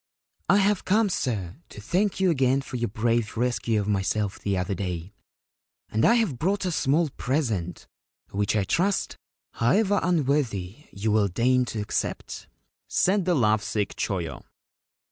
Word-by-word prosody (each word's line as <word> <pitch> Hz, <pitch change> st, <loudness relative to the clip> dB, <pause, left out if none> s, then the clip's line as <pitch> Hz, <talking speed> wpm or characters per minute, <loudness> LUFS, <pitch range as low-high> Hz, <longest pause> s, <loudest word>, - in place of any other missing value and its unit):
c -, -, +6 dB
1 -, -, +5 dB
have 200 Hz, 0 st, +2 dB
come, 210 Hz, +2 st, +2 dB
sir, 105 Hz, -, -2 dB
to -, -, -11 dB
thank 185 Hz, -, 0 dB
you 190 Hz, -2 st, +3 dB
again 135 Hz, -3 st, +2 dB
for 135 Hz, -, -8 dB
your 120 Hz, 0 st, -1 dB
brave 115 Hz, +1 st, 0 dB
rescue 120 Hz, -2 st, 0 dB
of 100 Hz, -, -2 dB
myself 100 Hz, 0 st, -1 dB
the 100 Hz, -2 st, -1 dB
other 90 Hz, +2 st, -1 dB
day, 90 Hz, 0 st, -4 dB, 0.8 s
and 110 Hz, -, +1 dB
I 235 Hz, -, +6 dB
have 210 Hz, -, 0 dB
brought 190 Hz, +5 st, 0 dB
a 180 Hz, -, 0 dB
small 155 Hz, +1 st, +1 dB
present, 115 Hz, -, -2 dB, 0.5 s
which, 100 Hz, +2 st, 0 dB
I 105 Hz, -, +2 dB
trust, 190 Hz, -, 0 dB, 0.4 s
however 200 Hz, -, +2 dB
unworthy, 140 Hz, -, 0 dB
you 105 Hz, +2 st, -2 dB
will 105 Hz, -1 st, +3 dB
deign 125 Hz, +7 st, +2 dB
to 110 Hz, -3 st, -4 dB
accept/ 105 Hz, -, -3 dB, 0.4 s
said 190 Hz, 0 st, +2 dB
the 180 Hz, -1 st, +2 dB
love 110 Hz, -5 st, +3 dB
sick 105 Hz, -1 st, -2 dB
Choyo. 90 Hz, -5 st, -3 dB
120 Hz, 160 wpm, -26 LUFS, 105-170 Hz, 0.8 s, c